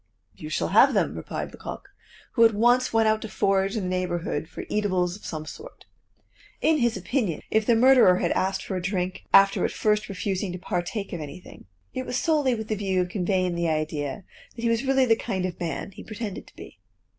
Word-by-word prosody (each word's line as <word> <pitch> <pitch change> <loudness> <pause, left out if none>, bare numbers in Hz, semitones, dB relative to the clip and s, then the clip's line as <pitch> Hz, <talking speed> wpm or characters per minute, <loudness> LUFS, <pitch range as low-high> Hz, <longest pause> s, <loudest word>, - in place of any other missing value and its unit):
"You 155 - -9
shall - - -1
have - - +5
them," - - +1
replied - - -5
Lecoq, - - -8 0.4
who 230 - +4
at 225 -2 +5
once 245 +4 +3
went 225 -1 +3
out 215 0 +2
to 220 - -6
forage 195 +1 +1
in 210 - -2
the 180 - -2
neighborhood 175 -4 -2
for - - -7
eatables 185 -4 0
of 210 - -10
some 155 -1 -5
sort. 480 - -11 0.7
In 315 -1 +3
his 235 -2 +1
opinion, 220 - -2
if 220 0 +2
the 235 - +5
murderer 245 -6 +6
had - - 0
asked 190 +1 0
for 190 - -4
a 185 - -2
drink 185 0 -3
after 195 0 +5
at - - +2
first 210 0 0
refusing 195 0 -2
to - - -4
partake 180 +3 -3
of 170 - -4
anything, 150 +5 -10 0.3
it 255 0 -4
was 250 - -1
solely 295 -6 +2
with 220 -1 -6
the 215 - 0
view 190 -2 -1
of 180 0 0
conveying 185 -1 0
the 170 -1 0
idea 155 0 -2 0.3
that 235 - -8
he 235 - +2
was 230 +2 +1
really 270 -1 +3
the 225 -2 +4
kind 195 -5 -3
of 185 - -5
man 175 +3 -4
he - - -11
pretended 215 -2 -6
to - - -19
be. - - -12
195 Hz, 215 wpm, -25 LUFS, 180-230 Hz, 0.7 s, murderer